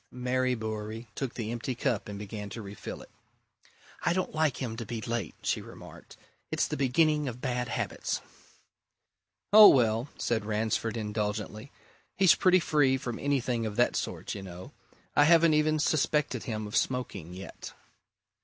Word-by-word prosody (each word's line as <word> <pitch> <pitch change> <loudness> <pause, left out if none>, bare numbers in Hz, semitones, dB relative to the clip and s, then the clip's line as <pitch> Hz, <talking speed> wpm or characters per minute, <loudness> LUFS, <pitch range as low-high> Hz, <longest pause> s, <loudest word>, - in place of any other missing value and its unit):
Mary 125 0 0
Bewery 110 0 -5
took 135 -3 -4
the 115 -2 -3
empty 120 +2 -3
cup 120 -5 -1
and 100 - -6
began 105 0 -6
to 115 - -7
refill 100 0 -8
it. - - -19 0.9
"I 170 - +2
don't 185 0 -2
like 155 -4 +1
him 120 -4 -3
to 115 - -4
be 115 0 -5
late," 115 -6 -3
she - - 0
remarked. - - -13 0.3
"It's - - 0
the - - -3
beginning 150 +3 +2
of 125 -1 -5
bad 125 -1 -2
habits." 110 - -2 1.3
"Oh, 215 0 +11
well!" 115 -1 +3
said 115 -3 -1
Ransford 110 +1 -1
indulgently. 105 +2 -3 0.5
"He's 190 -2 +7
pretty 185 -1 +4
free 145 -5 +2
from 120 -3 -5
anything 130 -4 0
of 105 - -5
that 120 +2 +2
sort, - - -3
you 100 - -6
know. 90 -1 -9 0.4
I 145 - +6
haven't 165 0 +6
even 155 0 +3
suspected 150 -4 +1
him 110 -2 -3
of 105 - -6
smoking, 100 -9 -2
yet." 95 +1 -9
120 Hz, 160 wpm, -29 LUFS, 110-140 Hz, 1.3 s, Oh